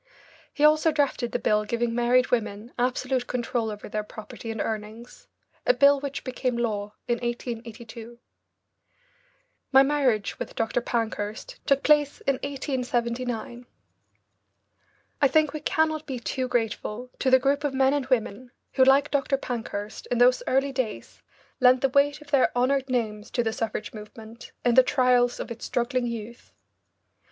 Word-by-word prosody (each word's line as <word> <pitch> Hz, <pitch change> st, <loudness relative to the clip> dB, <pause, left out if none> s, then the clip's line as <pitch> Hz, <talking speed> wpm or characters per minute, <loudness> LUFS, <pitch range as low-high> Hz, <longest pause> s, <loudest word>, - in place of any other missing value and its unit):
He 295 Hz, -, -3 dB
also 310 Hz, +1 st, +5 dB
drafted 280 Hz, -5 st, 0 dB
the -, -, 0 dB
bill 210 Hz, -3 st, +1 dB
giving 235 Hz, +2 st, -1 dB
married 245 Hz, +1 st, +2 dB
women 220 Hz, -1 st, -2 dB
absolute 255 Hz, 0 st, 0 dB
control 240 Hz, -2 st, -2 dB
over 210 Hz, -1 st, -7 dB
their 215 Hz, +1 st, -2 dB
property 215 Hz, +2 st, -9 dB
and 225 Hz, -1 st, -4 dB
earnings, 220 Hz, +3 st, -6 dB, 0.4 s
a -, -, +3 dB
bill 280 Hz, 0 st, +5 dB
which 280 Hz, 0 st, -5 dB
became 255 Hz, -1 st, -2 dB
law 210 Hz, -3 st, -2 dB
in 240 Hz, -1 st, 0 dB
1882. 235 Hz, -1 st, -6 dB, 1.5 s
My 270 Hz, 0 st, +7 dB
marriage 270 Hz, -7 st, 0 dB
with -, -, -6 dB
Dr. 225 Hz, +2 st, 0 dB
Pankhurst 225 Hz, -, -3 dB
took 275 Hz, -1 st, +3 dB
place 295 Hz, -1 st, +3 dB
in 275 Hz, -1 st, 0 dB
1879. 245 Hz, -3 st, -3 dB, 1.5 s
I 280 Hz, -, +6 dB
think 305 Hz, +2 st, +2 dB
we 305 Hz, -, -4 dB
cannot 315 Hz, 0 st, 0 dB
be 265 Hz, -, -3 dB
too 255 Hz, +2 st, -2 dB
grateful 235 Hz, 0 st, -2 dB
to 265 Hz, -, +2 dB
the 260 Hz, -, +7 dB
group 280 Hz, +2 st, 0 dB
of 285 Hz, -2 st, -1 dB
men 265 Hz, +1 st, +3 dB
and 285 Hz, -3 st, -1 dB
women 250 Hz, -1 st, -1 dB, 0.2 s
who, 260 Hz, -, +5 dB
like 275 Hz, +2 st, +4 dB
Dr. 275 Hz, -1 st, +1 dB
Pankhurst, 225 Hz, -5 st, -5 dB
in 245 Hz, -, 0 dB
those 250 Hz, +1 st, +5 dB
early 270 Hz, +2 st, +2 dB
days 255 Hz, -5 st, -4 dB, 0.4 s
lent 255 Hz, -1 st, +5 dB
the 270 Hz, -, +2 dB
weight 285 Hz, +2 st, +2 dB
of 295 Hz, -1 st, -15 dB
their 275 Hz, -3 st, +4 dB
honoured 265 Hz, +2 st, +1 dB
names 220 Hz, -4 st, -2 dB
to 240 Hz, -, 0 dB
the 225 Hz, -1 st, -1 dB
suffrage 220 Hz, -2 st, -4 dB
movement 220 Hz, +1 st, -11 dB
in 245 Hz, -, +4 dB
the 260 Hz, -, +8 dB
trials 250 Hz, -2 st, +2 dB
of -, -, -6 dB
its 235 Hz, -, -7 dB
struggling 245 Hz, 0 st, -1 dB
youth. 235 Hz, 0 st, -7 dB
245 Hz, 155 wpm, -26 LUFS, 230-270 Hz, 1.5 s, the